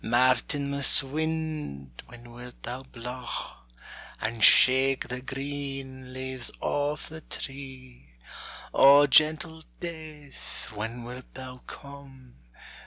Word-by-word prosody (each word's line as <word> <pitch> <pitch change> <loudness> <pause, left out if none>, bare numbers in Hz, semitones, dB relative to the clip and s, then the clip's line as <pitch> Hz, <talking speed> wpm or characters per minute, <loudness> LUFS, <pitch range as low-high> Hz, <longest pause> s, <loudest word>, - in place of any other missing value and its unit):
Martinmas 140 +4 +4
wind, 150 - -4
when 120 0 -13
wilt 125 +1 -12
thou 125 +2 -5
blaw, 125 -1 -7 0.6
And 110 0 -2
shake 130 +1 +6
the 125 0 -4
green 135 -1 -6
leaves 130 -1 -4
off 145 +1 -2
the 160 0 -9
tree? 130 - -9 0.6
O 140 +1 +8
gentle 155 +3 +3 0.2
death, 155 -4 -8
when 115 +3 -5
wilt 125 +1 -10
thou 130 -1 -9
come? 135 -3 -12
130 Hz, 100 wpm, -27 LUFS, 125-145 Hz, 0.6 s, O